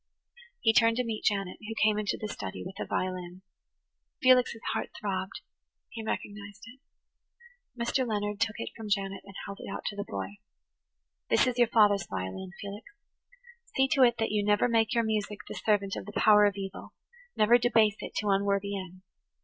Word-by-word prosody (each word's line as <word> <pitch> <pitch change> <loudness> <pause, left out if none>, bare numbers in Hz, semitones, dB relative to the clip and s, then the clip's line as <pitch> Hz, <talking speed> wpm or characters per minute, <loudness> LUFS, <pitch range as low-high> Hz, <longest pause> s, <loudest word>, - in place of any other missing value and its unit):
He 225 - +4
turned 230 0 +4
to 250 - +2
meet 225 -2 -4
Janet, 195 -3 0
who 225 +1 -7
came 210 -1 +2
into 210 -2 -1
the 215 - -3
study 95 - -6
with 190 - -8
a - - -3
violin. 185 0 -3 0.8
Felix's 250 -3 +4
heart - - -2
throbbed; 190 -2 -3 0.5
he 225 - -7
recognized 205 -1 -5
it. 250 +4 -13 1.0
Mr. 245 +2 0
Leonard 210 -1 -2
took 225 -1 +1
it - - -5
from 220 -2 -7
Janet 195 -1 -1
and 195 -1 -13
held 200 0 -7
it - - -8
out - - -6
to 205 - -8
the 205 - -3
boy. 205 0 -6 0.9
"This - - +4
is 250 -1 -1
your 240 - +6
father's 205 -5 +4
violin, 95 - -5
Felix. 205 +1 -7 0.9
See 265 0 +4
to 270 - +2
it 240 -2 +5
that 225 -1 0
you 210 -1 +1
never 205 +3 +3
make 225 -2 +2
your 235 -1 +2
music 215 -2 -2
the - - -6
servant 200 -3 0
of - - -6
the 205 - -8
power 210 -1 +7
of 205 -1 +1
evil–never 240 - -1
debase 225 -3 +3
it - - -7
to 210 - -1
unworthy 200 0 +1
ends. 185 -1 -8
210 Hz, 180 wpm, -29 LUFS, 200-225 Hz, 1.0 s, power